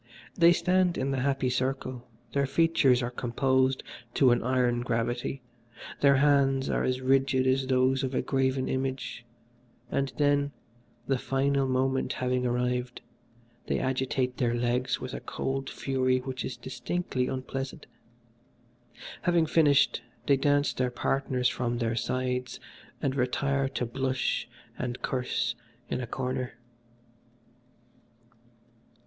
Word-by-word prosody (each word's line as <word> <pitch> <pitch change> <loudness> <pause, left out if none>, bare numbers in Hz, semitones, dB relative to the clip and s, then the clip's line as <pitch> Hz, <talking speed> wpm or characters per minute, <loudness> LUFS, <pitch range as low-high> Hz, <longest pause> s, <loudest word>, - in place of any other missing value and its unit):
They 170 0 +6
stand 180 0 +2
in 135 +1 -1
the 135 - -1
happy 135 -1 0
circle, 130 -1 -2 0.3
their 140 -1 +1
features 140 -6 +3
are 120 - -2
composed 130 +2 +1 0.3
to 130 -3 +5
an 120 - +3
iron 125 -1 +1
gravity, 120 +2 -2 0.6
their 140 -1 +5
hands 135 -1 +3
are - - 0
as 130 0 0
rigid 135 0 +2
as 130 0 +2
those 130 0 +2
of 130 0 -2
a - - +1
graven 130 -1 0
image, 130 -2 -3 0.7
and 135 -1 0
then, 145 -1 +2 0.5
the 135 -2 0
fatal 135 +1 +1
moment 130 +1 0
having 125 0 0
arrived, 125 0 -1 0.7
they - - +1
agitate 130 -1 -1
their 120 -2 +1
legs 120 +1 0
with 130 0 -6
a - - -4
cold 135 0 -3
fury 130 -1 0
which 130 -1 -4
is 125 - -5
distinctly 125 +2 -2
unpleasant. 130 0 -5 1.4
Having 175 -2 +3
finished 150 -3 +3 0.2
they 140 - +5
dash 145 +1 +2
their 125 -1 0
partners 125 0 0
from 120 -1 -1
their 115 -1 -1
sides 125 +1 -2 0.4
and 135 - +1
retire 135 +1 0
to 130 -2 -2
blush 130 +1 -1 0.3
and 125 0 -4
curse 125 -1 -1 0.4
in - - -1
a 120 - -4
corner. 130 0 -3
130 Hz, 130 wpm, -28 LUFS, 125-135 Hz, 1.4 s, They